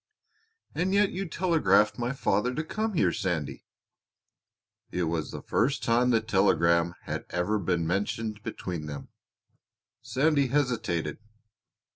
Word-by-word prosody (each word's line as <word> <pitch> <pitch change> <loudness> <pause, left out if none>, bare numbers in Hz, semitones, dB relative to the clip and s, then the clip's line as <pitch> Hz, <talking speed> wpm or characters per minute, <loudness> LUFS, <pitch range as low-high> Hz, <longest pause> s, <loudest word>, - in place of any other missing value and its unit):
"And 185 +3 0
yet 205 0 +4
you 195 +1 -3
telegraphed 110 - +2
my 120 +1 -1
father 125 -2 0
to 155 - -1
come 215 +5 -2
here, 165 - +3
Sandy." 80 -7 -3 1.2
It 90 - -1
was 80 -3 -2
the - - -7
first 135 +5 0
time 120 +2 +3
the 115 -2 +3
telegram 85 -5 +2
had - - -4
ever 90 +5 0
been 85 -3 0
mentioned 105 +4 -2
between 90 -8 -5
them. 70 -1 -7 0.9
Sandy 140 0 +2
hesitated. 115 - -1
110 Hz, 125 wpm, -28 LUFS, 85-140 Hz, 1.2 s, yet